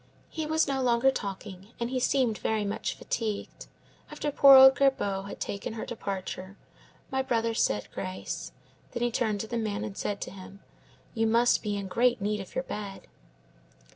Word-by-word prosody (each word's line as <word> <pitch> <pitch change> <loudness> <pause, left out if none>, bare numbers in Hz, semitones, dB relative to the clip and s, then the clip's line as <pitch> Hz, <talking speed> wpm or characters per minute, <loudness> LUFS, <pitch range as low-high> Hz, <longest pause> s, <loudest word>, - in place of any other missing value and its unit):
He 315 -1 -4
was 315 0 +2
no 270 -1 0
longer 245 +1 +3
talking, 195 -2 -7
and 235 +1 -2
he 260 - 0
seemed 250 -4 +1
very 215 -2 0
much 200 - -3
fatigued. 215 -3 -4 0.4
After 295 - -3
poor 275 -1 +8
old 265 0 +10
Gerbaud 205 -9 +1
had - - -8
taken 200 +2 -4
her 225 - -5
departure, 195 -3 -5 0.5
my 265 0 +1
brother 230 -3 0
said 105 - 0
grace; 180 -2 -5 0.4
then 240 -1 -2
he 240 - +1
turned 215 -4 0
to 220 - -6
the 235 +1 -2
man 215 -1 -2
and 210 -3 -6
said 200 0 -3
to - - -5
him, 195 +1 -12 0.5
'You 225 -1 +1
must 235 +2 +3
be 205 -2 -2
in 200 -1 -4
great 235 +6 +2
need 210 +1 -1
of 195 - -9
your 260 - 0
bed. 205 -5 -7
220 Hz, 180 wpm, -28 LUFS, 200-250 Hz, 0.5 s, old